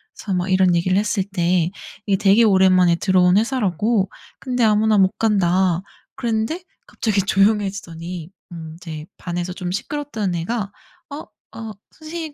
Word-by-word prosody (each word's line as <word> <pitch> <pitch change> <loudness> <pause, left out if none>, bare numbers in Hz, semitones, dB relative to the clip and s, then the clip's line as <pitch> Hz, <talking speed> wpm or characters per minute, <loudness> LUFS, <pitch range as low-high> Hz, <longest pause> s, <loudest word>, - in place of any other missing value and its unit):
그래서 200 - -5
막 180 +1 -1
이런 185 -1 +4
얘기를 185 +2 +1
했을 210 -1 0
때 180 -3 0 0.4
"이게 195 -2 +2
되게 205 +3 +4
오랜만에 185 -4 +5
들어온 185 0 +3
회사"라고 215 -3 +1 0.3
"근데 250 -2 -1
아무나 215 0 +3
못 190 -1 +4
간다." 185 -4 +2 0.3
그랬는데 235 +8 -2 0.2
갑자기 210 -4 0
조용해지더니 190 -4 -1 0.2
음 160 -2 -8
이제 160 -3 -8
반에서 175 0 -4
좀 180 -2 -5
시끄럽던 215 -4 -3
애가 200 +4 -3 0.4
어 290 - -7 0.3
어 225 -1 -6 0.2
"선생님 315 -1 -7
195 Hz, 320 characters per minute, -21 LUFS, 180-220 Hz, 0.4 s, 오랜만에